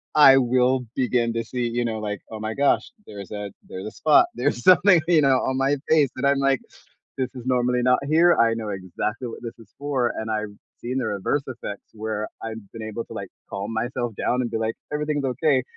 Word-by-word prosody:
I 135 -3 +8
will 125 0 +2
begin 120 -2 +1
to 115 0 -1
see, 125 -1 -2
you 120 +1 -1
know, 110 -1 -2
like, 105 -1 -4
"Oh 110 - -6
my 110 +1 -3
gosh, 140 0 +2 0.2
there's 100 -2 -9
a 105 -1 -5 0.2
there's 95 - -7
a 110 - -5
spot, 150 -1 +4
there's 120 -1 -1
something," 180 -1 +6
you 160 -3 +5
know, 135 -2 +4
"on 130 - -1
my 135 +2 +2
face," 155 -3 +5
and 130 - -2
I'm 140 0 +3
like, 135 -2 +2 0.6
"This 130 -2 -1
is 125 - -8
normally 125 -1 +1
not 125 0 +3
here, 165 +3 +5
I 115 -1 +3
know 115 -2 -5
exactly 100 +6 -4
what - - -8
this 115 - -7
is 115 - -17
for," 135 -4 0
and 110 - -4
I've 105 -1 -2 0.3
seen 125 +2 -3
the 125 - -1
reverse 105 +8 -1
effects 120 -5 -7
where 110 0 -3 0.2
I've 110 0 -5
been 115 - -8
able 110 +1 -5
to - - -13
like - - -6 0.2
calm 100 +3 -5
myself 120 +1 -2
down 125 +1 0
and 120 - -3
be - - -2
like, 110 0 -1 0.2
"Everything's 150 -1 -1
okay," 130 +1 +2
120 Hz, 220 wpm, -24 LUFS, 110-135 Hz, 0.6 s, I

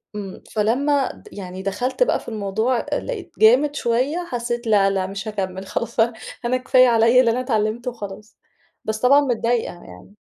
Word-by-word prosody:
إمم، 195 -2 -7
فلما 265 +6 +1
د - - -17
يعني 185 -1 -7
دخلت 245 - 0
بقى - - +1
في - - -9
الموضوع 220 +3 -1
أ - - 0
لقيت 470 -7 -6
جامد 260 +7 +5
شويّة، 265 +8 0
حسّيت 240 -1 -3
لأ، 200 -2 +4
لأ، 190 -1 -1
مش 195 +2 -6
هاكمل 190 -2 -4
خلاص، 235 0 -4
ف - - +3 0.4
أنا 250 +2 +1
كفاية 255 0 +4
عليَّ 230 +1 +5
اللي 235 -3 +4
أنا 245 - -1
اتعلمته 235 0 -1
وخلاص، 210 -2 -9 0.5
بس 220 0 -2
طبعًا 275 +4 +5
متضايقة 240 -4 0
يعني. 90 - -14
230 Hz, 175 wpm, -21 LUFS, 205-255 Hz, 0.5 s, جامد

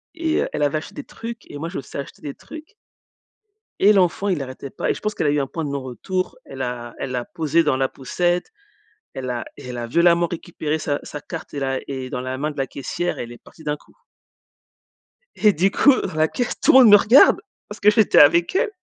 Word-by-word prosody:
et 325 -1 0
heu, - - -2
elle 150 - -1
avait 145 +1 +1
acheté - - -12
des 290 - -6
trucs 230 -3 -9
et 145 - -7
moi 165 +3 -4
je 180 - -6
me - - -3
suis - - -9
acheter 140 - -8
des 145 - -5
trucs 315 - -12 1.1
et 205 +2 +6
l'enfant 190 0 +2
il 175 -6 0
arrêtait 130 +1 -7
pas - - -3
et - - +3
je - - -9
pense 210 0 -2
qu'elle - - 0
a - - +4
eu 145 - +1
un 135 - -1
point 165 +3 -4
de - - -3
non 140 -1 -3
retour, 185 - -4
elle 135 -1 -8
a 120 -2 -5
elle 135 - -4
l'a 125 -1 -3
posé 165 +1 +1
dans 150 -4 +1
la 135 0 0
poussette. 175 - -1 0.6
Elle 130 -1 -5
a 120 - -3
et - - -10
elle 125 - -5
a 120 -1 -4
violemment 170 +5 +3
récupéré 160 -2 -4
sa 145 -2 -2
sa 145 - -7
carte 165 -3 -8
et - - -2
la 135 -1 -1
et 130 -2 -5
dans 125 - -3
la 130 +1 -4
main 150 +3 -2
de 145 - -14
la 135 -1 -1
caissière 175 +7 -4
et - - -2
elle 120 - -9
est 120 - -10
partie 160 - -17
d'un 150 -1 -2
coup - - -25 1.4
et 210 - +4
du 190 +4 +2
coup, 280 - +5
à 250 - -3
la 155 0 +3
caisse, 245 +6 -3
tout - - +5
le 265 - +9
monde 245 -4 +8
me 205 - +10
regarde! 230 +7 +6 0.3
Parce 210 - -9
que 210 - +5
j'étais 210 0 +4
avec 170 - +5
elle 385 - +2
155 Hz, 255 wpm, -21 LUFS, 135-190 Hz, 1.4 s, me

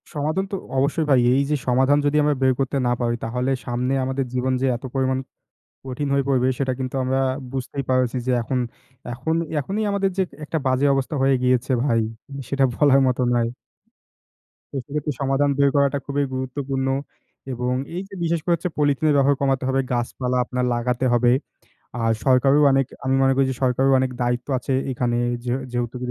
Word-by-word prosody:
সমাধান 155 +5 -1
তো - - -1 0.2
অবশ্যই 145 +4 +1
ভাই। 135 -3 +5
এই 135 - +3
যে - - +3
সমাধান 130 +3 +4
যদি 145 +1 +1
আমরা 150 0 +2
বের 130 -1 +4
করতে 135 +1 0
না - - +2
পারি 120 -1 +1
তাহলে 125 +3 -1 0.2
সামনে 125 +2 -1
আমাদের 130 +1 -1
জীবন 130 +1 0
যে - - +2
এত 120 - -20
পরিমাণ 130 -1 +1 0.7
কঠিন 135 +2 -3
হয়ে 140 0 +2
পড়বে 130 -2 +2
সেটা 130 -2 0
কিন্তু 130 0 -4
আমরা 130 +1 0 0.3
বুঝতেই 135 +1 -4
পারছি 130 -1 +1
যে - - +2
এখন 130 +2 -1 0.5
এখন 150 +7 -2 0.2
এখনই 195 +9 -2
আমাদের 200 -1 +1
যে 190 - +3 0.2
একটা 160 - -2
বাজে 130 +1 +2
অবস্থা 135 +2 -1
হয়ে 135 0 +4
গিয়েছে 125 +1 +2
ভাই। 115 -5 +2 0.5
সেটা 140 -1 +1
বলার 140 -1 +5
মতো 125 0 0
নয়। 120 -1 +2 1.3
তো - - -4
সেক্ষেত্রে 150 +1 -3
সমাধান 135 +1 +2
বের 140 0 +4
করাটা 140 0 +2
খুবই 140 0 0
গুরুত্বপূর্ণ 135 +1 -3 0.7
এবং 125 +1 -1 0.2
এই 180 - -2
যে 200 - -17
বিশেষ 170 0 +1
করে 175 - +2
হচ্ছে 170 +2 -4
পলিথিনের 145 +1 +2
ব্যবহার 140 0 +3
কমাতে 135 -1 +1
হবে, 135 0 +1
গাছপালা 125 +1 -1
আপনার 125 0 -2
লাগাতে 125 +2 -1
হবে। 120 0 +4 0.7
আর 115 0 +2
সরকারেরও 135 +2 +4
অনেক 135 -1 +2 0.2
আমি 130 0 +1
মনে 135 0 +4
করি 135 - +4
যে - - -2
সরকারেরও 135 +1 +3
অনেক 130 0 0
দায়িত্ব 120 +1 -1
আছে 130 - -2 0.2
এখানে 120 -1 -1 0.3
যে 120 - -1 0.2
যে 120 - -1
যেহেতু 120 +1 -4
135 Hz, 185 wpm, -22 LUFS, 125-140 Hz, 1.3 s, ভাই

